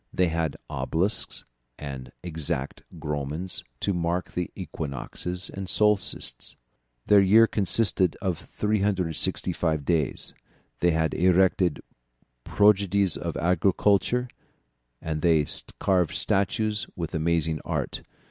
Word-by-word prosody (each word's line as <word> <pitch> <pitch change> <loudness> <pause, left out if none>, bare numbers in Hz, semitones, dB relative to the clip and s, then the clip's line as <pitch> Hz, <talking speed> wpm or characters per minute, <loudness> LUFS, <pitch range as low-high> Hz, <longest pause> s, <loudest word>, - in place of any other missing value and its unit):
They 90 -2 +2
had 80 -3 -2
obelisks 95 +7 -1 0.3
and 70 -3 -7
exact 80 -5 -2
gnomons 75 +5 -4 0.2
to 100 - 0
mark 85 +1 -1
the 90 -1 -3
equinoxes 85 +2 -4
and 95 -1 -6
solstices. 105 -2 +1 0.5
Their 105 -1 +6
year 105 +4 +6
consisted 95 -4 +1
of 95 -5 -2
365 90 -6 -1
days. 80 -4 0 0.5
They 90 - +3
had 80 -1 +1
erected 90 -1 +2 0.6
prodigies 100 -3 +3
of - - -4
architecture, 100 +7 +2 0.8
and 80 -1 -3
they 80 -3 +3 0.3
carved 90 -4 +1
statues 105 +2 0
with 85 -3 -5
amazing 80 -1 0
art. - - -3
90 Hz, 100 wpm, -26 LUFS, 80-100 Hz, 0.8 s, Their